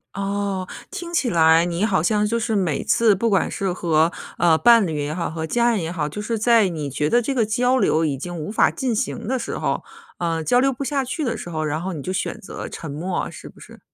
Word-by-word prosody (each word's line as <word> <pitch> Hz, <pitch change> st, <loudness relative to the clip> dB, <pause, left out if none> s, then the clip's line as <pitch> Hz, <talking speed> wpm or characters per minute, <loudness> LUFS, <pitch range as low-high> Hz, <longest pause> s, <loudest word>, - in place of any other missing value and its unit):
哦。 200 Hz, -1 st, -2 dB, 0.2 s
听 350 Hz, -3 st, -7 dB
起 280 Hz, -7 st, +1 dB
来 165 Hz, -2 st, +5 dB
你 175 Hz, +4 st, 0 dB
好 190 Hz, -7 st, +1 dB
像 210 Hz, +1 st, +2 dB
就 230 Hz, +2 st, 0 dB
是 220 Hz, -1 st, -1 dB
每 175 Hz, -8 st, 0 dB
次 220 Hz, -4 st, +3 dB
不 230 Hz, +5 st, 0 dB
管 195 Hz, -3 st, +2 dB
是 195 Hz, -2 st, -2 dB
和， 165 Hz, -2 st, +2 dB, 0.3 s
呃， 165 Hz, -2 st, +4 dB
伴 230 Hz, +1 st, +6 dB
侣 160 Hz, -4 st, -3 dB
也 150 Hz, -, -3 dB
好、 170 Hz, +1 st, -2 dB
和 160 Hz, 0 st, -4 dB
家 240 Hz, +5 st, +2 dB
人 210 Hz, -6 st, 0 dB
也 160 Hz, -, -3 dB
好， 160 Hz, -4 st, -2 dB
就 210 Hz, -, -6 dB
是 225 Hz, +1 st, -2 dB
在 225 Hz, -1 st, +4 dB
你 155 Hz, -4 st, -4 dB
觉 150 Hz, +3 st, -1 dB
得 240 Hz, -, +3 dB
这 275 Hz, +4 st, -2 dB
个 235 Hz, -4 st, +2 dB
交 245 Hz, +4 st, +2 dB
流 160 Hz, -9 st, +2 dB
已 140 Hz, -3 st, -1 dB
经 175 Hz, +5 st, -6 dB
无 155 Hz, +5 st, -5 dB
法 220 Hz, -, +4 dB
进 250 Hz, -3 st, -2 dB
行 210 Hz, -, -3 dB
的 260 Hz, 0 st, 0 dB
时 -, -, -4 dB
候， -, -, -1 dB, 0.3 s
呃， 165 Hz, -2 st, -1 dB
交 245 Hz, +8 st, +3 dB
流 270 Hz, +1 st, +3 dB
不 265 Hz, +3 st, -5 dB
下 275 Hz, -1 st, 0 dB
去 285 Hz, +5 st, -3 dB
的 235 Hz, -4 st, -1 dB
时 175 Hz, -, -7 dB
候， 155 Hz, -2 st, -3 dB
然 155 Hz, +1 st, -2 dB
后 190 Hz, 0 st, -3 dB
你 150 Hz, -, -6 dB
就 185 Hz, -, -4 dB
选 -, -, -3 dB
择 -, -, -7 dB
沉 160 Hz, -, -7 dB
默， 175 Hz, +6 st, -3 dB
是 -, -, -10 dB
不 -, -, -18 dB
是？ -, -, -14 dB
195 Hz, 275 characters per minute, -22 LUFS, 165-235 Hz, 0.3 s, 伴